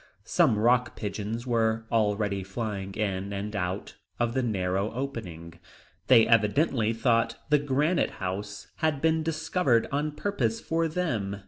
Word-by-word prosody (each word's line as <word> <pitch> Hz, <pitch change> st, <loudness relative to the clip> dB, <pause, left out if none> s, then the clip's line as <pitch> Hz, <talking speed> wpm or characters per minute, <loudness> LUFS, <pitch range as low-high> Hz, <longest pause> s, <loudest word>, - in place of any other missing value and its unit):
Some 110 Hz, -, +3 dB
rock 120 Hz, +3 st, +2 dB
pigeons 105 Hz, +3 st, -4 dB
were 115 Hz, -2 st, +1 dB
already 105 Hz, -3 st, +1 dB
flying 95 Hz, -1 st, -5 dB
in 100 Hz, -2 st, -2 dB
and 100 Hz, +2 st, -4 dB
out 95 Hz, 0 st, -3 dB, 0.2 s
of 120 Hz, -1 st, +1 dB
the 130 Hz, -, +1 dB
narrow 100 Hz, -3 st, -1 dB
opening; 90 Hz, -11 st, -6 dB, 0.5 s
they 115 Hz, -4 st, +7 dB
evidently 115 Hz, +1 st, +2 dB
thought 115 Hz, 0 st, +1 dB
that 145 Hz, -1 st, +3 dB
Granite 150 Hz, +6 st, +2 dB
House 100 Hz, +2 st, -4 dB
had 155 Hz, -3 st, 0 dB
been 160 Hz, +1 st, +2 dB
discovered 160 Hz, -5 st, +1 dB
on 150 Hz, +2 st, -1 dB
purpose 130 Hz, -, -1 dB
for 165 Hz, 0 st, 0 dB
them. 120 Hz, -, -2 dB
115 Hz, 135 wpm, -27 LUFS, 100-140 Hz, 0.5 s, they